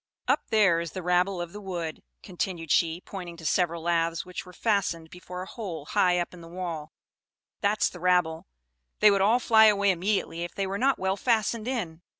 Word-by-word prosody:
"Up -, -, +1 dB
there 205 Hz, -7 st, +4 dB
is 170 Hz, -1 st, -5 dB
the 185 Hz, -, -5 dB
rabble 180 Hz, +2 st, +2 dB
of 175 Hz, -1 st, -5 dB
the 210 Hz, -, -8 dB
wood," 175 Hz, -5 st, -5 dB, 0.2 s
continued 175 Hz, -3 st, -4 dB
she, 165 Hz, +1 st, +2 dB
pointing 180 Hz, -4 st, -8 dB
to 165 Hz, -, -11 dB
several 170 Hz, -1 st, +1 dB
laths 165 Hz, 0 st, 0 dB
which 180 Hz, 0 st, -7 dB
were -, -, -10 dB
fastened 180 Hz, -6 st, -1 dB
before 180 Hz, 0 st, -8 dB
a -, -, -8 dB
hole 185 Hz, -8 st, -6 dB
high 180 Hz, +3 st, +2 dB
up 175 Hz, 0 st, -2 dB
in 175 Hz, -, -11 dB
the 165 Hz, -, -11 dB
wall; 170 Hz, -3 st, -5 dB, 0.7 s
"that's 205 Hz, +1 st, +2 dB
the 180 Hz, -, -8 dB
rabble; 175 Hz, -2 st, +1 dB, 0.5 s
they 210 Hz, -1 st, +7 dB
would 200 Hz, -1 st, +2 dB
all 215 Hz, +5 st, +4 dB
fly 220 Hz, -2 st, +5 dB
away 200 Hz, -2 st, +4 dB
immediately, 185 Hz, -2 st, -1 dB
if 175 Hz, -, -7 dB
they 195 Hz, -, -1 dB
were 195 Hz, +1 st, -3 dB
not 270 Hz, +1 st, +3 dB
well 190 Hz, +1 st, -1 dB
fastened 225 Hz, 0 st, 0 dB
in. 180 Hz, -11 st, -3 dB
180 Hz, 200 wpm, -27 LUFS, 170-200 Hz, 0.7 s, they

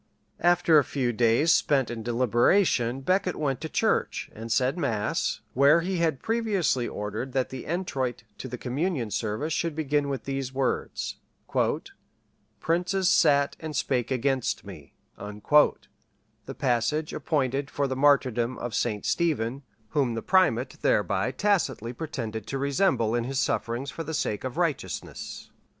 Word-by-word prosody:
] -, -, -44 dB
After 175 Hz, -2 st, +5 dB
a -, -, +2 dB
few 125 Hz, -2 st, -1 dB
days 120 Hz, +8 st, +3 dB
spent 135 Hz, -6 st, +2 dB
in 115 Hz, -1 st, -5 dB
deliberation 120 Hz, -, +2 dB
Becket 185 Hz, +4 st, +1 dB
went 140 Hz, -3 st, -2 dB
to 160 Hz, -, -4 dB
church, -, -, 0 dB
and 115 Hz, +1 st, -7 dB
said 130 Hz, +4 st, +2 dB
mass, 120 Hz, -12 st, -1 dB
where 140 Hz, +5 st, +5 dB
he 185 Hz, +2 st, -2 dB
had 160 Hz, -5 st, 0 dB
previously 205 Hz, -, +1 dB
ordered 105 Hz, +5 st, -5 dB
that 130 Hz, -1 st, 0 dB
the 130 Hz, -1 st, -7 dB
entroit 135 Hz, -9 st, -2 dB, 0.2 s
to -, -, -5 dB
the 125 Hz, 0 st, -6 dB
communion 130 Hz, -, -2 dB
service 115 Hz, +11 st, -2 dB
should 165 Hz, -2 st, -1 dB
begin 145 Hz, -2 st, 0 dB
with 135 Hz, -2 st, -3 dB
these 135 Hz, -1 st, -3 dB
words, 135 Hz, 0 st, -2 dB, 1.4 s
"Princes 180 Hz, +3 st, +1 dB
sat 140 Hz, -5 st, +4 dB
and 155 Hz, -2 st, -6 dB
spake 125 Hz, -2 st, 0 dB
against 130 Hz, -2 st, 0 dB
me;" 85 Hz, -8 st, -11 dB, 0.2 s
the 105 Hz, +9 st, -1 dB
passage 140 Hz, +5 st, 0 dB
appointed 140 Hz, -2 st, -1 dB
for 140 Hz, -, -1 dB
the 130 Hz, -1 st, -2 dB
martyrdom 130 Hz, -3 st, +2 dB
of 120 Hz, -2 st, -5 dB
St. 105 Hz, 0 st, -1 dB
Stephen, 140 Hz, -7 st, 0 dB, 0.3 s
whom 130 Hz, -4 st, 0 dB
the 115 Hz, -, -4 dB
primate 135 Hz, -10 st, +2 dB
thereby 100 Hz, +1 st, +1 dB
tacitly 130 Hz, -, 0 dB
pretended 115 Hz, -7 st, -5 dB
to 135 Hz, -, -3 dB
resemble 140 Hz, -, +1 dB
in 120 Hz, -1 st, 0 dB
his 135 Hz, +1 st, -3 dB
sufferings 125 Hz, +2 st, -1 dB
for 165 Hz, +6 st, -5 dB
the 160 Hz, 0 st, -4 dB
sake 105 Hz, -7 st, -2 dB
of 130 Hz, +3 st, -5 dB
righteousness. 170 Hz, -5 st, -3 dB
135 Hz, 145 wpm, -27 LUFS, 120-155 Hz, 1.4 s, After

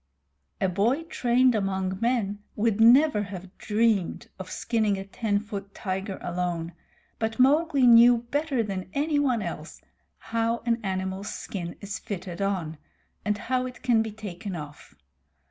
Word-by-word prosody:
A 190 Hz, -, +2 dB
boy 220 Hz, -, +1 dB
trained 250 Hz, -5 st, +2 dB
among 190 Hz, -2 st, -1 dB
men 230 Hz, -4 st, 0 dB, 0.2 s
would 220 Hz, 0 st, +1 dB
never 245 Hz, +1 st, +6 dB
have 190 Hz, -1 st, -8 dB
dreamed 215 Hz, -4 st, 0 dB
of 185 Hz, -1 st, -7 dB
skinning 220 Hz, -4 st, 0 dB
a 195 Hz, -, -6 dB
ten 205 Hz, +1 st, -1 dB
foot 205 Hz, -2 st, -7 dB
tiger 190 Hz, 0 st, -3 dB
alone, 175 Hz, -1 st, -2 dB, 0.5 s
but 225 Hz, 0 st, -2 dB
Mowgli 280 Hz, +1 st, +4 dB
knew 240 Hz, 0 st, +8 dB
better 285 Hz, -4 st, 0 dB
than 190 Hz, -3 st, -5 dB
anyone 285 Hz, -6 st, +1 dB
else -, -, -6 dB, 0.4 s
how 230 Hz, +1 st, -1 dB
an 235 Hz, 0 st, +1 dB
animal's 190 Hz, +1 st, -3 dB
skin 175 Hz, -4 st, -6 dB
is 200 Hz, 0 st, -5 dB
fitted 190 Hz, -4 st, -6 dB
on, 175 Hz, -6 st, -2 dB, 0.4 s
and 210 Hz, 0 st, 0 dB
how 255 Hz, +3 st, -1 dB
it 250 Hz, -, -11 dB
can 240 Hz, -3 st, +4 dB
be 220 Hz, -1 st, -3 dB
taken 205 Hz, -2 st, -6 dB
off. 150 Hz, -2 st, -9 dB
210 Hz, 145 wpm, -26 LUFS, 190-240 Hz, 0.5 s, knew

